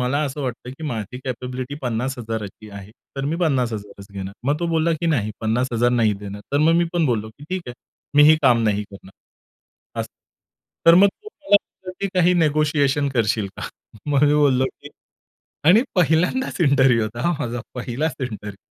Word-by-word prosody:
मला 125 +4 0
असं 145 +1 -4
वाटतं, 125 -1 -5
की 135 +5 -9
माझी 115 -2 -4
कॅपॅबिलिटी 125 +1 -5
50,000ची 115 -4 -4
आहे. 100 0 -10 0.3
तर 135 - -2
मी 155 +4 -1
50,000च 115 - -2
घेणार." 95 0 -6
मग 145 +2 +1
तो 170 - 0
बोलला, 165 +1 +2
की 160 +2 -2
"नाही, 115 -10 +1
50,000 120 +1 +1
नाही 115 -3 +3
देणार." 100 0 -7
तर 140 - +3
मग 165 - +4
मी - - +2
पण 170 -3 +2
बोललो, 110 -3 -1
की 145 - -11
"ठीक 185 -1 -2
आहे 120 - -7 0.4
मी 145 - +8
ही 155 - +6
काम 120 -3 +4
नाही 105 -1 +1
करणार," 95 -1 -13 0.9
असं. - - -5 0.8
तर 165 - +9
मग 195 +3 +7
तो 425 - -11
मला 295 -9 +3
बोलला, 185 -2 -8
की 200 - 0
काही 180 0 +4
निगोशिएशन 150 -3 +2
करशील 110 -3 +1
का? - - -5 0.4
मग 145 0 +3
मी 145 - +4
बोललो, 140 -3 +3
की - - -7 0.8
आणि 195 +8 +7
पहिल्यांदाच 180 - +1
इंटरव्ह्यू 135 -6 +4
होता 110 +2 -4
हा 175 - +2
माझा 120 0 -3
पहिलाचं 130 +3 -3
इंटरव्ह्यू. 105 -4 -7
130 Hz, 180 wpm, -22 LUFS, 115-155 Hz, 0.9 s, तर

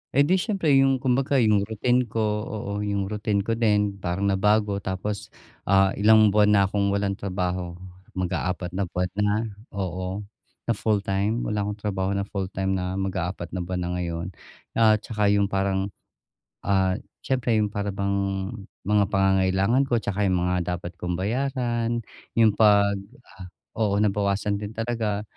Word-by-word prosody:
Edi 160 +7 +4
siyempre, 190 -7 0
yung 135 -1 +2
kumbaga 135 +2 +1
yung 105 -5 +3
routine 120 +3 +1
ko, 110 0 -1 0.2
oo. 100 -2 -5
Yung 100 -1 -2
routine 105 -1 0
ko 115 +2 -2
din, 105 -3 +2
parang 90 +1 -2
nabago. 105 +1 +2
Tapos, 100 +2 -4 0.4
ah, 95 0 +4
ilang 110 0 +6
buwan 105 0 +4
na 100 - +5
akong 100 +1 0
walang 100 -1 0
trabaho. 90 -2 -3 0.4
Mag-aapat 90 0 -2
na 95 0 -2
buwan 90 +1 -2
na 105 - +3 0.5
oo, 95 +1 -3 0.4
na - - 0
full-time? 105 +1 0
Wala 105 -1 -1
akong 105 0 -4
trabaho 100 -1 -1
na 100 - 0
full-time 95 -1 -3
na 95 0 -1
mag-aapat 95 -2 -3
na 90 - -3
buwan 90 +1 -3
na 90 - -3
ngayon. 85 -1 -3 0.5
At 110 -1 +4
'tsaka 105 -2 0
yung 100 0 +2
parang, 95 0 0 0.8
ah, 95 0 +2 0.2
siyempre, 125 -3 0
yung 105 - -1
para 100 -1 -3
bang 100 -1 -1 0.3
mga 105 0 +3
pangangailangan 95 +6 +3
ko 120 -3 0
'tsaka 100 0 0
yung 90 -2 +1
mga 90 0 0
dapat 90 0 -6
kong 90 0 -2
bayaran, 120 +2 -1 0.3
yung 115 -2 +5
pag 100 -2 +5 0.8
oo, 105 -3 +1
nabawasan 100 0 0
din 105 +1 -6
talaga, 115 -3 -2
100 Hz, 150 wpm, -25 LUFS, 95-110 Hz, 0.8 s, ilang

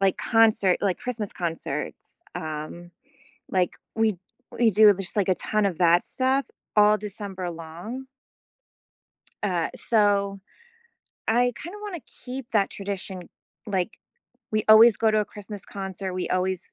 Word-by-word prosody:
Like 195 -1 +3
concert 220 -5 +3
like 190 -4 +1
Christmas 230 -5 -4
concerts, 170 -2 -5 0.2
um, 155 +3 -6 0.6
like, 185 -2 0 0.2
we 220 -3 +2 0.3
we 235 -1 +3
do 210 0 +7
just, 195 +1 -4
like, 195 -2 +2
a - - +5
ton 215 +3 0
of 185 -4 -1
that 175 0 +5
stuff 265 +1 +1 0.3
all 210 0 +6
December 200 -3 -6
long. 170 +10 -7 1.4
Uh, 180 -5 0
so, 200 -3 +2 0.9
I 245 +2 +3
kinda 355 +6 -8
wanna 395 -5 -5
keep 250 0 -9
that 205 -3 +2
tradition, 195 -2 -6 0.4
like, 195 0 -2 0.5
we 215 -1 0
always 220 0 +9
go 225 - +3
to 215 - +2
a 210 - +2
Christmas 205 -1 -9
concert, 190 -1 -5
we 185 - -2
always 185 0 -1
200 Hz, 135 wpm, -25 LUFS, 185-220 Hz, 1.4 s, always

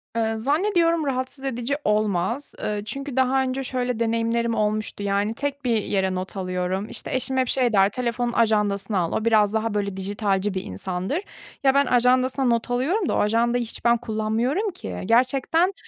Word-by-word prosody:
Eee, 225 -1 +1
zannediyorum 330 - +2
rahatsız 260 0 -2
edici 255 +1 -1
olmaz. 210 +4 0
Eee, 210 -1 -2
çünkü 275 +3 -5
daha 265 0 +3
önce 265 +1 -2
şöyle 250 -2 -2
deneyimlerim 230 0 0
olmuştu 215 -1 -1
yani 200 +2 0
tek 280 +2 -4
bir 230 -3 +2
yere 190 -2 0
not 185 +2 -5
alıyorum, 185 +2 -2
işte - - -5
eşim 260 +1 -1
hep 255 - +2
şey 245 -2 +1
der, 195 -1 +5
telefonun 240 +1 -2
ajandasına 210 -3 +1
al, 170 -2 -1
o 220 - -1
biraz 215 -2 +4
daha 220 0 0
böyle 200 -2 -2
dijitalci 200 0 -1
bir 185 - -3
insandır. 180 - -3 0.4
Ya 270 -1 +5
ben 280 +1 +4
ajandasına 255 +2 +2
not 235 -1 +1
alıyorum 315 - 0
da - - +1
o - - +1
ajandayı 235 +3 +2
hiç 230 - -8
ben 235 0 +5
kullanmıyorum 230 - -1
ki. 360 - -7
Gerçekten 265 - +2
230 Hz, 175 wpm, -24 LUFS, 210-260 Hz, 0.4 s, der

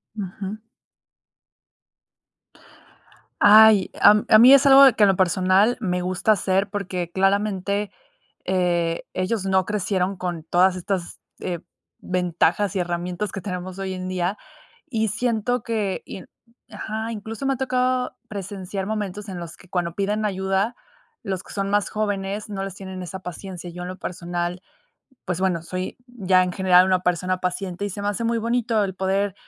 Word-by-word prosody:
Ujú. 200 +1 -6 2.8
Ay, 215 -1 +7
a 210 +1 +7
a 215 - +7
mí 250 +4 +9
es 275 +1 +6
algo 275 0 +9
de 265 -4 +8
que 215 - +2
en 200 - +6
lo 195 - +3
personal 185 +5 +3
me 180 -5 -1
gusta 185 +4 0
hacer, 195 +1 0
porque 185 -4 -4
claramente, 200 +1 0 0.5
eh, 175 -3 0
ellos 190 +2 -1
no 190 -1 +2
crecieron 195 -2 -1
con 175 -3 -4
todas 180 +3 +3
estas, 185 -1 -4 0.2
eh, 175 -2 -4 0.4
ventajas 180 +2 0
y - - 0
herramientas 175 +3 -3
que 195 - -6
tenemos 180 0 -6
hoy 190 -1 -3
en 185 0 -5
día, 185 +2 -2 0.5
y 220 -3 0
siento 235 +2 -1
que 210 -4 -2
y 190 - -8 0.5
Ajá, 220 +1 -4
incluso 220 +3 -6
me 270 - +2
ha - - -5
tocado 255 -1 0
presenciar 195 -1 -5
momentos 210 -1 -4
en 185 -2 -6
los 170 -1 -8
que 185 - -19
cuando 175 -2 -2
piden 205 +3 -1
ayuda, 195 +3 -1 0.5
los 190 -3 -4
que - - -14
son 195 -1 -2
más 205 -1 +1
jóvenes, 205 -1 -3
no 195 -2 -4
les 195 -1 -6
tienen 190 -1 -7
esa 180 +2 -7
paciencia. 180 0 -8
Yo, 175 +1 -8
en 180 - -5
lo 185 - -7
personal, 175 0 -4 0.6
pues 180 -1 -3
bueno, 180 -3 0
soy 185 +2 -5
ya 195 -7 +2
en 180 - -3
general 185 -1 +5
una 185 -1 +2
persona 180 +1 0
paciente, 185 +1 -3
y 205 - -3
se 200 - -6
me 205 - -1
hace 205 +2 -2
muy 230 0 +1
bonito 230 -1 0
el 190 -2 -4
poder 195 +1 0
195 Hz, 165 wpm, -23 LUFS, 180-210 Hz, 2.8 s, mí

